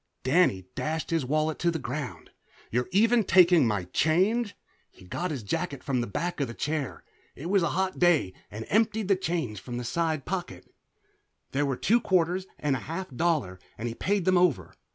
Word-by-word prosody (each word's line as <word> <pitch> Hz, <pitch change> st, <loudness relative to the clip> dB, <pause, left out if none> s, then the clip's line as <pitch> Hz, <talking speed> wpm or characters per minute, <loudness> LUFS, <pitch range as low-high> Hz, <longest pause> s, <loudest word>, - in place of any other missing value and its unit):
Danny 130 Hz, -, +3 dB
dashed 160 Hz, +2 st, -3 dB
his 160 Hz, -6 st, 0 dB
wallet 155 Hz, +2 st, 0 dB
to 175 Hz, -, +2 dB
the 165 Hz, -, -1 dB
ground. 130 Hz, -1 st, -6 dB, 0.4 s
"You're 125 Hz, +6 st, 0 dB
even 225 Hz, +4 st, +4 dB
taking 175 Hz, -6 st, +6 dB
my 105 Hz, -4 st, 0 dB
change!" 195 Hz, -, +1 dB, 0.3 s
He -, -, -18 dB
got 175 Hz, -, -3 dB
his 140 Hz, -8 st, -4 dB
jacket 150 Hz, -, -3 dB
from 130 Hz, -3 st, 0 dB
the 120 Hz, -, -3 dB
back 170 Hz, -, -3 dB
of 135 Hz, -, -1 dB
a 115 Hz, -, -7 dB
chair 150 Hz, -2 st, -3 dB, 0.3 s
it 165 Hz, +6 st, -5 dB
was 200 Hz, -2 st, +4 dB
a 170 Hz, -, +1 dB
hot 190 Hz, 0 st, -1 dB
day 170 Hz, -, +3 dB, 0.2 s
and 110 Hz, +2 st, -7 dB
emptied 215 Hz, -2 st, +2 dB
change 165 Hz, -, -2 dB
from 120 Hz, +4 st, -6 dB
the 125 Hz, -, -3 dB
side 155 Hz, +3 st, -1 dB
pocket. 175 Hz, -, -5 dB, 0.8 s
There 145 Hz, +1 st, +1 dB
were 135 Hz, -2 st, -1 dB
two 235 Hz, +3 st, +3 dB
quarters 185 Hz, +1 st, +1 dB
and 145 Hz, -2 st, 0 dB
a -, -, -3 dB
half 175 Hz, 0 st, -4 dB
dollar, 140 Hz, -, 0 dB, 0.2 s
and 115 Hz, -, -3 dB
he 115 Hz, -, -3 dB
paid 195 Hz, -, -1 dB
them 185 Hz, -1 st, +4 dB
over. 100 Hz, -, +1 dB
160 Hz, 190 wpm, -27 LUFS, 125-180 Hz, 0.8 s, taking